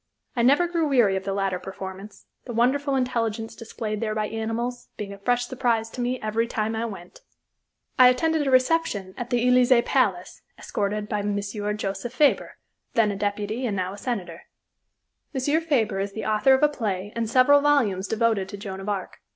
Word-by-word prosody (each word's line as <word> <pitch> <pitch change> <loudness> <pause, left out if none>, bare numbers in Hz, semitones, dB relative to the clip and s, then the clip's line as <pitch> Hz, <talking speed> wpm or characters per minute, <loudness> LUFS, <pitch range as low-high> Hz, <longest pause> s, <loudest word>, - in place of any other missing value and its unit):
I 240 - +1
never 285 +9 +4
grew 335 -2 0
weary 240 -9 +3
of 190 0 -3
the 195 - -1
latter 195 -2 -1
performance 190 +2 -9 0.2
the 240 - -6
wonderful 270 +4 +2
intelligence 230 -3 -1
displayed 215 -2 -5
there 215 -1 -1
by 215 -1 -1
animals, 225 +2 -3
being 200 -1 -5
a 200 - -12
fresh 245 +4 +1
surprise 235 -3 -1
to 250 - -5
me 250 +1 -1
every 220 +2 0
time 220 -1 -2
I 225 +1 -1
went. 195 - -9 0.8
I 255 - +9
attended 310 +3 +1
a - - +2
reception 255 - +1
at 245 0 -6
the 245 0 +1
Elysée 250 -1 +5
Palace, 195 -9 0 0.2
escorted 210 +1 -2
by 210 -1 -1
M. 205 0 -1
Joseph 205 +1 -4
Fabre, 290 +1 +2 0.4
then 220 -2 +3
a - - -4
deputy 205 +4 -2
and 205 - -2
now 185 0 -2
a - - -9
senator. 235 -8 -4 0.9
M. 290 +5 +1
Fabre 230 -11 0
is 195 0 -3
the 220 - -5
author 220 +5 +4
of 265 - -1
a - - +8
play 205 -8 -3
and 230 -2 -2
several 260 +4 +5
volumes 230 -10 +2
devoted 220 -3 +1
to 205 - -7
Joan 195 -1 -6
of 195 +2 -5
Arc. 195 -3 -4
225 Hz, 190 wpm, -25 LUFS, 200-250 Hz, 0.9 s, I